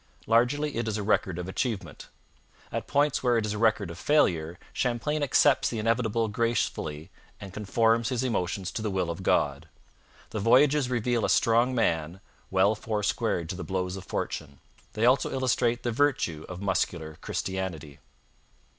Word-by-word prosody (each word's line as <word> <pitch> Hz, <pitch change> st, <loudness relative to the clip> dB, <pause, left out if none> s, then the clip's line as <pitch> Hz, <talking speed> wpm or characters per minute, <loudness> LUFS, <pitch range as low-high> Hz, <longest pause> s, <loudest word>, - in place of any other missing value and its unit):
Largely 125 Hz, +5 st, +2 dB
it 115 Hz, -1 st, -1 dB
is 110 Hz, -1 st, -1 dB
a 105 Hz, -, -3 dB
record 95 Hz, -3 st, +1 dB
of 90 Hz, 0 st, -5 dB
achievement. 110 Hz, +2 st, -4 dB, 0.6 s
At -, -, -4 dB
points 145 Hz, 0 st, +2 dB
where 125 Hz, -2 st, +2 dB
it 110 Hz, -, 0 dB
is 105 Hz, -, -2 dB
a 105 Hz, -, -4 dB
record 105 Hz, -5 st, +2 dB
of 85 Hz, -, -10 dB
failure 85 Hz, -, +2 dB, 0.2 s
Champlain 130 Hz, +5 st, -1 dB
accepts 145 Hz, 0 st, +3 dB
the 115 Hz, -, -4 dB
inevitable 115 Hz, 0 st, +1 dB
gracefully 105 Hz, -8 st, -2 dB, 0.3 s
and 100 Hz, -3 st, -9 dB
conforms 115 Hz, +3 st, +1 dB
his 125 Hz, -1 st, -1 dB
emotions 95 Hz, -5 st, -2 dB
to -, -, -4 dB
the 110 Hz, -, -1 dB
will 95 Hz, -3 st, -1 dB
of 85 Hz, -, -6 dB
God. -, -, 0 dB, 0.6 s
The 110 Hz, -, -3 dB
Voyages 135 Hz, +5 st, +4 dB
reveal 120 Hz, -1 st, 0 dB
a -, -, +1 dB
strong 120 Hz, +3 st, +3 dB
man 85 Hz, -5 st, 0 dB, 0.3 s
'well 95 Hz, +3 st, +3 dB
four 110 Hz, -1 st, -3 dB
squared 105 Hz, -5 st, 0 dB
to -, -, -3 dB
the 90 Hz, -, -6 dB
blows 90 Hz, -1 st, -2 dB
of 95 Hz, -, -7 dB
fortune.' 70 Hz, -5 st, -5 dB, 0.3 s
They 110 Hz, +2 st, +1 dB
also 130 Hz, +2 st, +3 dB
illustrate 125 Hz, -2 st, 0 dB
the 120 Hz, -, 0 dB
virtue 115 Hz, -, 0 dB
of 90 Hz, +2 st, -7 dB
muscular 85 Hz, -5 st, -2 dB
Christianity. 90 Hz, -7 st, -4 dB
110 Hz, 165 wpm, -27 LUFS, 90-120 Hz, 0.6 s, Voyages